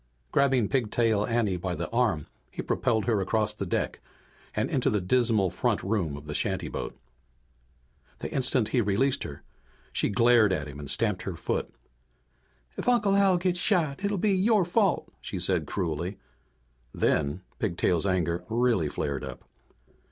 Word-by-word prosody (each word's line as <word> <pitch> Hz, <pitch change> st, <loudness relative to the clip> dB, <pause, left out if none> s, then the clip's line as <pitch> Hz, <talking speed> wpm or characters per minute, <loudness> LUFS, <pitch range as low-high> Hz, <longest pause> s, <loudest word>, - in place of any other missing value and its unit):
Grabbing 135 Hz, -5 st, +3 dB
Pigtail 115 Hz, -3 st, +1 dB
Anne 115 Hz, -6 st, +1 dB
by 90 Hz, 0 st, -3 dB
the -, -, -3 dB
arm, 115 Hz, -, +1 dB, 0.2 s
he -, -, -6 dB
propelled 110 Hz, -3 st, 0 dB
her 110 Hz, -5 st, +2 dB
across 105 Hz, +2 st, 0 dB
the 100 Hz, -2 st, -5 dB
deck -, -, -1 dB, 0.6 s
and -, -, +1 dB
into 135 Hz, 0 st, +1 dB
the 105 Hz, -4 st, +1 dB
dismal 110 Hz, -1 st, +2 dB
front 110 Hz, +4 st, 0 dB
room 95 Hz, -8 st, -1 dB
of 75 Hz, -, -11 dB
the 75 Hz, -, -5 dB
shantyboat. 95 Hz, -2 st, -2 dB, 1.2 s
The -, -, -6 dB
instant 130 Hz, -4 st, +2 dB
he 125 Hz, -, +2 dB
released 110 Hz, +6 st, +1 dB
her -, -, -8 dB, 0.5 s
she -, -, +1 dB
glared 115 Hz, -1 st, +5 dB
at 75 Hz, -5 st, -1 dB
him 70 Hz, 0 st, -9 dB
and 70 Hz, -2 st, -7 dB
stamped 105 Hz, -5 st, 0 dB
her 95 Hz, -, -4 dB
foot. -, -, -2 dB, 1.1 s
"If -, -, 0 dB
Uncle 210 Hz, -5 st, +3 dB
Al 195 Hz, -2 st, +4 dB
gets 175 Hz, 0 st, 0 dB
shot 175 Hz, -5 st, +1 dB
it'll 200 Hz, 0 st, 0 dB
be 200 Hz, +2 st, +2 dB
your 200 Hz, 0 st, +3 dB
fault," 195 Hz, +1 st, +1 dB
she -, -, -5 dB
said -, -, 0 dB
cruelly. 85 Hz, +1 st, -2 dB, 0.8 s
Then 75 Hz, +6 st, +1 dB, 0.2 s
Pigtail's 90 Hz, -2 st, +1 dB
anger 90 Hz, -2 st, 0 dB
really 115 Hz, -9 st, +2 dB
flared 70 Hz, -1 st, -3 dB
up. -, -, -8 dB
110 Hz, 155 wpm, -27 LUFS, 90-135 Hz, 1.2 s, glared